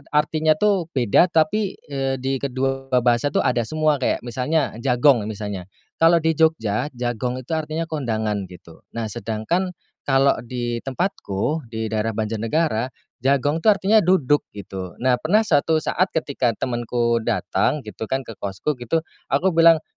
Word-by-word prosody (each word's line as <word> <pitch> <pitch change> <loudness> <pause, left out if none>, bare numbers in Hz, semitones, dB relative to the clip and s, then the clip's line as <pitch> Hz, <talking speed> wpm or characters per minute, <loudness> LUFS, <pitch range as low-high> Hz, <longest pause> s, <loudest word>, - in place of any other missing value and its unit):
artinya, 155 +1 +3
tuh, 195 -1 +1
beda, 125 - +4
tapi, 180 +5 +1 0.2
eee, 135 -1 -1
di 130 +1 -2
kedua 135 0 -2 0.2
bahasa, 120 +2 +3
tuh, 145 - +1
ada 125 -2 +1
semua, 155 -1 +1
kayak 130 - 0
misalnya 130 +5 0
jagong 125 -2 +3
misalnya, 105 -4 -5 0.3
kalau 165 +1 +6
di 160 - +3
Jogja 145 -7 +1
jagong 125 +1 -3
itu 130 - -11
artinya 160 0 -1
kondangan, 110 - -2
gitu. 85 -2 -14 0.2
Nah, 115 -2 -3
sedangkan 120 - -2 0.3
kalau 135 0 +3
di 120 -1 -3
tempatku, 135 - -2
di 110 -1 -4
daerah 110 0 -1
Banjarnegara, 115 +3 0 0.3
jagong, 140 +4 +1
tuh, 215 +4 +5
artinya 205 +3 +4
duduk, 165 -7 +2
gitu. 95 -3 -7
Nah, 130 -1 +3
pernah 205 +8 +3
suatu 160 -4 +2
saat 185 +3 +1
ketika 135 -6 0
temanku 120 -1 0
datang, 140 +5 0
gitu, 110 +1 -7
kan, 135 +3 -1
ke 115 -4 -10
kosku, 100 +9 -3
gitu, 125 +7 0 0.3
aku 145 +8 +2
bilang, 165 -1 +6
135 Hz, 150 wpm, -22 LUFS, 115-160 Hz, 0.3 s, kalau